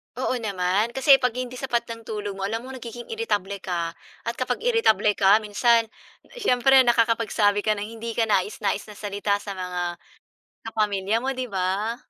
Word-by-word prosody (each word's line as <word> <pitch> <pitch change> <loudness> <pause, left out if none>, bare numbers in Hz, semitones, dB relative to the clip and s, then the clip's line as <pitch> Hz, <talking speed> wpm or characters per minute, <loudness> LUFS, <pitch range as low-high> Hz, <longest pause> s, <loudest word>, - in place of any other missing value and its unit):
Oo 255 +1 -1
naman. 200 +1 0
Kasi 270 0 +6
'pag 250 -2 0
hindi 250 0 -5
sapat 240 -3 0
ang 230 -1 -9
tulog 210 -2 -4
mo, 195 - -1
alam 225 +3 -3
mo 260 - -8
nagiging 240 -2 -8
irritable 200 - -2
ka 170 -3 -3 0.3
at 230 - -1
kapag 255 - -2
irritable 455 - +3
ka 205 +1 +4
minsan, 225 +2 +2 0.5
siyempre 270 - +4
nakakapagsabi 230 -3 +2
ka 215 +1 +1
ng 205 - -4 0.2
hindi 230 0 -5
kanais-nais 205 -2 0
na 210 - -11
salita 205 0 -1
sa 205 - -6
mga 180 -2 -4 0.7
kapamilya 210 0 0
mo, 270 - 0
'di 255 -1 -4
ba? 195 +3 -1
220 Hz, 165 wpm, -24 LUFS, 200-240 Hz, 0.7 s, Kasi